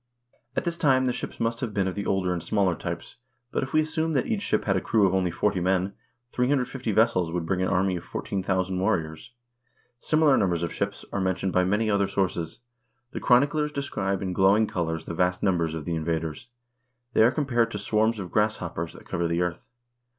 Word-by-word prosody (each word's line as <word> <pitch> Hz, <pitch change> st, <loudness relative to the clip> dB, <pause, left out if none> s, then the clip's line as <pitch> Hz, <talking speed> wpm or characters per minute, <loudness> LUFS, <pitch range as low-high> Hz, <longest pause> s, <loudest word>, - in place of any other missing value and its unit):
At -, -, 0 dB
this 170 Hz, -1 st, -2 dB
time 130 Hz, -5 st, +3 dB
the 125 Hz, -, +1 dB
ships -, -, -6 dB
must 115 Hz, 0 st, -1 dB
have 115 Hz, -6 st, -4 dB
been 95 Hz, -2 st, +1 dB
of 95 Hz, -, -2 dB
the 100 Hz, -, -4 dB
older 95 Hz, -2 st, +1 dB
and 85 Hz, -, -3 dB
smaller 95 Hz, +1 st, +1 dB
types; 85 Hz, +5 st, -6 dB, 0.3 s
but -, -, 0 dB
if 135 Hz, 0 st, -4 dB
we 155 Hz, -, +4 dB
assume 160 Hz, +1 st, -1 dB
that 135 Hz, -, +1 dB
each 220 Hz, -3 st, -1 dB
ship 205 Hz, -, 0 dB
had 95 Hz, -, +2 dB
a 95 Hz, -, +1 dB
crew 105 Hz, -3 st, +3 dB
of 95 Hz, -, +2 dB
only 95 Hz, -1 st, +2 dB
40 100 Hz, +2 st, 0 dB
men, 95 Hz, +2 st, +1 dB, 0.4 s
350 125 Hz, -2 st, 0 dB
vessels 100 Hz, -6 st, +2 dB
would 85 Hz, -1 st, -2 dB
bring 90 Hz, +2 st, 0 dB
an 95 Hz, -, +1 dB
army 95 Hz, 0 st, +1 dB
of -, -, -8 dB
14,000 95 Hz, -1 st, -2 dB
warriors. 80 Hz, +2 st, -2 dB, 0.7 s
Similar 155 Hz, -2 st, +3 dB
numbers 90 Hz, -4 st, +1 dB
of 85 Hz, -, -3 dB
ships 100 Hz, 0 st, -3 dB
are 100 Hz, -, 0 dB
mentioned 95 Hz, 0 st, -1 dB
by 90 Hz, 0 st, +3 dB
many 105 Hz, +4 st, +1 dB
other 100 Hz, -2 st, +2 dB
sources. 90 Hz, -2 st, -2 dB, 0.5 s
The -, -, -4 dB
chroniclers 145 Hz, +4 st, +3 dB
describe 100 Hz, -9 st, -2 dB
in 95 Hz, -1 st, -2 dB
glowing 95 Hz, +4 st, +4 dB
colors 80 Hz, -4 st, -3 dB
the -, -, -5 dB
vast 90 Hz, +1 st, 0 dB
numbers 85 Hz, -5 st, +1 dB
of 80 Hz, -, -5 dB
the 85 Hz, -, -2 dB
invaders. 80 Hz, +4 st, -3 dB, 0.7 s
They -, -, +4 dB
are 115 Hz, -, +7 dB
compared 125 Hz, -5 st, +1 dB
to 105 Hz, -, -5 dB
swarms 110 Hz, +2 st, +1 dB
of 95 Hz, -4 st, -6 dB
grasshoppers 85 Hz, -6 st, -1 dB
that -, -, -14 dB
cover 85 Hz, 0 st, -1 dB
the 85 Hz, +1 st, +1 dB
earth. 90 Hz, -1 st, -4 dB
95 Hz, 210 wpm, -26 LUFS, 90-115 Hz, 0.7 s, are